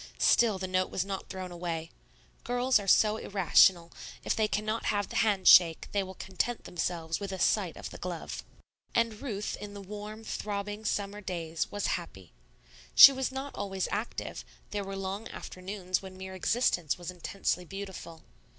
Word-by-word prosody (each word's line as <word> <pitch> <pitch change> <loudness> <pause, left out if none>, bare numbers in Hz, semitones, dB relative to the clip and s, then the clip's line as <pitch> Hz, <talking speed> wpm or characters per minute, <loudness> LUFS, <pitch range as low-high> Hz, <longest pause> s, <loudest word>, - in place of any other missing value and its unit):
Still 225 -4 +4
the 190 - -4
note 185 0 0
was 185 - -2
not 195 -1 -5
thrown 185 -1 -6
away. 170 -2 -4 0.5
Girls 245 0 +2
are 200 - -7
so 215 +2 +5
irrational; 180 -3 +4 0.3
if - - 0
they 220 -1 +2
cannot 215 +2 -2
have 205 -1 0
the - - -3
hand 205 -5 +2
shake, 165 -3 +7
they 200 - +1
will 190 0 -7
content 190 +7 -3
themselves 165 -1 -3
with 200 -1 -5
a 190 - -4
sight - - +1
of - - -7
the - - -10
glove. - - -5 0.5
And 230 -2 +1
Ruth 210 -7 -3
in 205 0 -7
the - - -7
warm, 210 +2 -8
throbbing, 205 0 -4
summer 205 0 -2
days 165 -4 -3
was 205 -1 -3 0.2
happy. 95 - -14 0.6
She - - +12
was 265 0 -2
not 270 +1 -5
always 195 -2 -3
active; 215 +3 -4 0.3
there 205 -1 -2
were 195 0 -6
long 195 +3 -4
afternoons 185 -1 -4
when 190 -1 -10
mere 190 0 -7
existence 185 - +1
was 175 0 -6
intensely 180 0 -2
beautiful. 190 -3 -8
195 Hz, 170 wpm, -30 LUFS, 180-210 Hz, 0.6 s, She